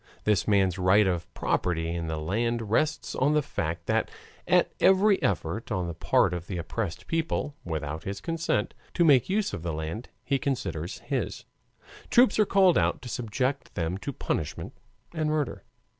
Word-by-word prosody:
This 105 Hz, -4 st, +2 dB
man's 95 Hz, -3 st, +3 dB
right 95 Hz, +3 st, +5 dB
of 90 Hz, -3 st, -1 dB
property 80 Hz, -2 st, 0 dB
in 85 Hz, -1 st, -3 dB
the 80 Hz, 0 st, -2 dB
land 110 Hz, +7 st, -1 dB
rests 155 Hz, +4 st, +1 dB
on 145 Hz, +3 st, +2 dB
the 150 Hz, -, +3 dB
fact 85 Hz, -, -3 dB
that -, -, +1 dB, 0.4 s
at -, -, +4 dB
every 195 Hz, +2 st, +5 dB
effort 100 Hz, +2 st, -1 dB
on 90 Hz, -1 st, 0 dB
the 85 Hz, -, -4 dB
part 85 Hz, -, +2 dB
of 90 Hz, 0 st, -5 dB
the 95 Hz, -, -4 dB
oppressed 85 Hz, +2 st, -4 dB
people, 165 Hz, -3 st, -1 dB
without 80 Hz, -2 st, -4 dB
his 100 Hz, +1 st, -4 dB
consent, 165 Hz, -6 st, -1 dB, 0.2 s
to 170 Hz, -, +4 dB
make 140 Hz, -3 st, +5 dB
use 205 Hz, +1 st, 0 dB
of -, -, -4 dB
the 85 Hz, -1 st, -3 dB
land 80 Hz, +10 st, -5 dB
he 140 Hz, -1 st, 0 dB
considers 95 Hz, -, -3 dB
his, -, -, -3 dB, 0.6 s
troops 240 Hz, -3 st, +5 dB
are 210 Hz, -, +4 dB
called 190 Hz, -3 st, +5 dB
out -, -, 0 dB
to 125 Hz, -, -7 dB
subject 125 Hz, +4 st, -2 dB
them 85 Hz, +1 st, -1 dB
to 140 Hz, -, -4 dB
punishment 80 Hz, -, -3 dB, 0.4 s
and 155 Hz, -2 st, 0 dB
murder. 155 Hz, -3 st, -2 dB
105 Hz, 175 wpm, -27 LUFS, -, 0.6 s, right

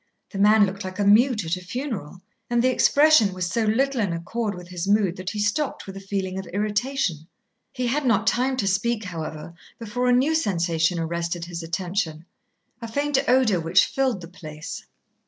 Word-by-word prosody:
The 195 Hz, -, -5 dB
man 210 Hz, +1 st, +6 dB
looked 195 Hz, +2 st, -5 dB
like 185 Hz, 0 st, -6 dB
a 205 Hz, -, 0 dB
mute 220 Hz, 0 st, +4 dB
at 165 Hz, +3 st, -1 dB
a -, -, -9 dB
funeral, 195 Hz, -, -5 dB, 0.3 s
and 240 Hz, 0 st, +2 dB
the 255 Hz, -, +4 dB
expression 285 Hz, -7 st, +4 dB
was 185 Hz, -1 st, -2 dB
so 220 Hz, +6 st, 0 dB
little 255 Hz, +4 st, +1 dB
in 195 Hz, -5 st, 0 dB
accord 205 Hz, +6 st, -3 dB
with 180 Hz, 0 st, -11 dB
his 180 Hz, 0 st, -4 dB
mood 200 Hz, -3 st, +2 dB
that 185 Hz, 0 st, -4 dB
he 215 Hz, -, -6 dB
stopped 210 Hz, +8 st, -1 dB
with 195 Hz, -, -9 dB
a -, -, -6 dB
feeling 195 Hz, -1 st, -3 dB
of 190 Hz, -, -7 dB
irritation. 205 Hz, -, -1 dB, 0.4 s
He 255 Hz, -, -3 dB
had 280 Hz, +5 st, 0 dB
not 225 Hz, -4 st, +2 dB
time 255 Hz, +3 st, +1 dB
to 200 Hz, -, 0 dB
speak, 215 Hz, +4 st, 0 dB
however, 160 Hz, -3 st, -6 dB, 0.2 s
before 235 Hz, +2 st, -2 dB
a -, -, +5 dB
new 260 Hz, +6 st, +3 dB
sensation 170 Hz, -, +1 dB
arrested 170 Hz, +1 st, -3 dB
his 170 Hz, -1 st, -6 dB
attention, 165 Hz, -1 st, -3 dB, 0.6 s
a 230 Hz, -, -5 dB
faint 285 Hz, +4 st, 0 dB
odour 245 Hz, -7 st, +3 dB
which 165 Hz, 0 st, +4 dB
filled 260 Hz, -8 st, -1 dB
the 170 Hz, -, -9 dB
place. 155 Hz, -4 st, -8 dB
200 Hz, 190 wpm, -24 LUFS, 175-240 Hz, 0.6 s, man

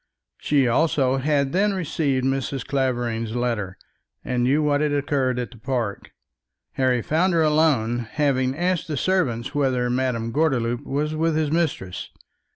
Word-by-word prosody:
She 140 Hz, -4 st, +2 dB
also 135 Hz, 0 st, +2 dB
had 140 Hz, 0 st, +1 dB
then 200 Hz, +2 st, +2 dB
received 145 Hz, -7 st, -1 dB
Mrs. 135 Hz, -1 st, -2 dB
Clavering's 120 Hz, -4 st, -1 dB
letter, 115 Hz, -6 st, -2 dB, 0.5 s
and 125 Hz, -1 st, -1 dB
knew 140 Hz, +5 st, +2 dB
what 145 Hz, -1 st, +2 dB
had 150 Hz, -1 st, +1 dB
occurred 140 Hz, -3 st, 0 dB
at 125 Hz, -1 st, -3 dB
the 120 Hz, -, -14 dB
park. 115 Hz, -5 st, -3 dB, 0.6 s
Harry 125 Hz, -3 st, +1 dB
found 175 Hz, +4 st, +1 dB
her 165 Hz, -1 st, +3 dB
alone, 135 Hz, -7 st, +2 dB
having 135 Hz, -3 st, +1 dB
asked 180 Hz, 0 st, 0 dB
the 150 Hz, -3 st, -3 dB
servant 135 Hz, -9 st, 0 dB
whether 130 Hz, -4 st, +1 dB
Madame 125 Hz, -3 st, -1 dB
Gordeloup 125 Hz, -5 st, 0 dB
was 150 Hz, +3 st, -1 dB
with 160 Hz, 0 st, 0 dB
his 155 Hz, -2 st, 0 dB
mistress. 155 Hz, -, -2 dB
135 Hz, 150 wpm, -23 LUFS, 120-155 Hz, 0.6 s, her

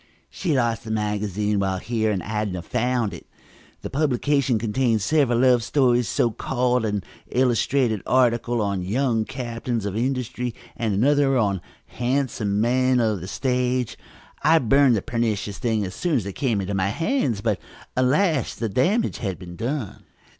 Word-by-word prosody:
"She 165 Hz, -6 st, -1 dB
lost 115 Hz, -2 st, 0 dB
a -, -, -5 dB
magazine 105 Hz, -1 st, -1 dB
while 95 Hz, -1 st, 0 dB
here 110 Hz, +2 st, -1 dB
and 95 Hz, -5 st, -1 dB
Adnah 105 Hz, -4 st, -3 dB
found 125 Hz, -2 st, 0 dB
it. -, -, -10 dB, 0.6 s
The -, -, -5 dB
publication 140 Hz, -2 st, +1 dB
contained 115 Hz, 0 st, 0 dB
several 135 Hz, -1 st, +2 dB
love 125 Hz, -1 st, +4 dB
stories, 125 Hz, -1 st, +2 dB
so 120 Hz, +5 st, +1 dB
called, 125 Hz, 0 st, 0 dB
an 105 Hz, -3 st, -1 dB, 0.3 s
illustrated 125 Hz, -3 st, +1 dB
article 120 Hz, -2 st, +2 dB
on 100 Hz, -2 st, -1 dB
'Young 115 Hz, +3 st, 0 dB
Captains 120 Hz, -3 st, -4 dB
of 100 Hz, -1 st, -3 dB
Industry' 125 Hz, 0 st, -2 dB, 0.2 s
and 110 Hz, -4 st, -1 dB
another 135 Hz, +4 st, +3 dB
on 100 Hz, -6 st, +1 dB, 0.2 s
'Handsome 125 Hz, -4 st, -1 dB
Young 100 Hz, +1 st, +1 dB
Men 130 Hz, +2 st, +3 dB
of 110 Hz, -5 st, +1 dB
the 90 Hz, -, -6 dB
Stage.' 125 Hz, +1 st, -1 dB, 0.5 s
I 160 Hz, +3 st, +5 dB
burned 135 Hz, -1 st, +4 dB
the 100 Hz, -, -1 dB
pernicious 110 Hz, -4 st, -2 dB
thing 110 Hz, -4 st, 0 dB
as 95 Hz, -, -6 dB
soon 170 Hz, -, -1 dB
as 115 Hz, -7 st, 0 dB
it 100 Hz, -, -5 dB
came 115 Hz, -5 st, 0 dB
into 95 Hz, +1 st, -3 dB
my 95 Hz, 0 st, +1 dB
hands, 135 Hz, -, 0 dB
but, 110 Hz, -3 st, 0 dB, 0.4 s
alas, 140 Hz, -, +2 dB
the 115 Hz, -, -2 dB
damage 190 Hz, -, +1 dB
had 95 Hz, -6 st, -3 dB
been 90 Hz, -1 st, -10 dB
done!" 120 Hz, +1 st, -4 dB
120 Hz, 160 wpm, -23 LUFS, 105-130 Hz, 0.6 s, I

